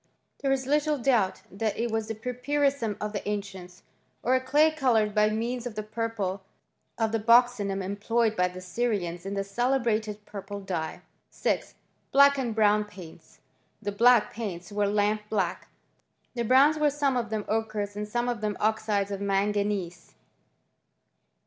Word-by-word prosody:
There 275 - +1
is 265 -1 0
little 300 +2 +1
doubt 235 -7 +1
that 205 +1 -2
it 235 0 -1
was 220 -1 -1
the 225 - -4
pwrpfu^ 250 +6 -3
rissum 275 -8 +1
of 210 0 -4
the 205 0 -3
ancients, 195 -3 -6 0.4
or 255 - +2
a 260 - +3
clay 295 +5 +4
coloured 235 -8 +2
by 210 0 +4
means 235 +3 -2
of 230 - -8
the 215 - -3
purple 215 -3 -3 0.6
of 225 -1 0
the 225 - 0
buccinum 225 -4 +3
employed 220 +3 0
by 180 -2 +2
the 180 0 -9
Syrians 185 -3 -2
in 200 - -3
the 195 - -1
celebrated 220 -1 -1
purple 200 0 -7
dye. 175 -5 -4 0.3
6. - - -2 0.4
Black 280 0 +6
and 235 -4 -2
brown 210 -1 +4
paints. 185 -6 -14 0.4
The 205 -1 -3
black 235 +2 +4
paints 200 -4 -6
were 205 0 +1
lamp 210 +1 +1
black: 195 -5 -1 0.7
the 240 - -3
browns 275 +6 +5
were 300 -1 +4
some 285 -2 0
of 235 -2 -1
them 215 -1 -3
ochres 215 -2 -2
and 210 0 -4
some 240 +3 -1
of 240 -3 -2
them 210 -2 -2
oxides 210 -2 0
of 200 0 -4
manganese. 200 -3 -1
215 Hz, 165 wpm, -27 LUFS, 200-245 Hz, 0.7 s, Black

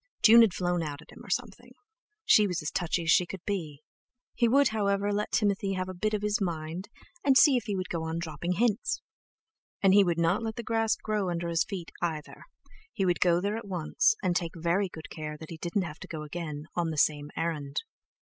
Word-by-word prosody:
June 230 +1 +9
had 225 -4 +5
flown 175 -1 0
out 145 -3 -4
at - - -18
him, - - -13
or - - -12
something; - - -4 0.5
she 210 -1 +6
was 180 -2 -2
as 150 - -2
touchy 175 0 -1
as 160 - +2
she 180 - +4
could 190 -1 -8
be! 155 -8 -4 0.5
He 235 - +2
would, 275 +3 +4
however, 205 -1 0
let 210 +1 -2
Timothy 200 -3 +1
have 185 -1 -2
a 185 - -5
bit 215 +4 -1
of 210 - -4
his 210 0 0
mind, 170 +1 -3 0.3
and 270 -2 +5
see 285 -2 +7
if 245 - 0
he 205 -4 -2
would 185 -2 -3
go 170 - -2
on 160 0 -3
dropping 170 +1 -3
hints! 225 +3 0 0.8
And 195 -1 +4
he 200 0 +7
would 175 -3 0
not 170 +5 +2
let 225 -1 -3
the 235 - -5
grass 225 0 +1
grow 210 -3 -2
under 170 0 -2
his 165 0 +2
feet 190 -6 -6
either, 160 -3 -4 0.5
he 195 - -1
would 175 -1 +1
go 175 -1 +4
there 200 +3 -1
at 225 - -8
once, 195 - +1
and 175 - +1
take 170 -2 -1
very 170 +4 0
good 160 -2 -10
care 150 -1 -6
that 160 +1 -11
he 165 - -6
didn't 175 +4 -1
have 160 -3 -7
to - - -9
go 155 -2 -6
again 150 -1 -6
on 170 -2 0
the 155 - -4
same 145 0 +2
errand. 155 -4 -2
180 Hz, 230 wpm, -29 LUFS, 165-205 Hz, 0.8 s, June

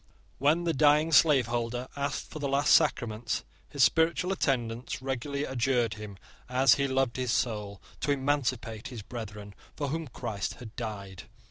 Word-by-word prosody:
When 150 +6 +3
the 170 -1 +1
dying 150 +2 +4
slaveholder 125 -5 +3
asked 140 0 -3
for 155 - -6
the 145 - -1
last 140 +1 +3
sacraments, 115 -1 +1 0.3
his 140 -3 +2
spiritual 170 +5 +3
attendants 120 -8 -1
regularly 135 +2 -3
adjured 125 -3 +1
him, 105 -2 -9 0.3
as 130 0 +5
he 140 -1 +1
loved 130 -2 0
his 125 -2 -1
soul, 105 -5 -1 0.2
to - - -2
emancipate 130 -5 -1
his 120 -5 -8
brethren 105 -3 -8 0.2
for 145 -2 -2
whom 160 +2 -3
Christ 115 -5 -4
had 120 -2 -11
died. 100 -6 -6
125 Hz, 150 wpm, -29 LUFS, 115-140 Hz, 0.3 s, as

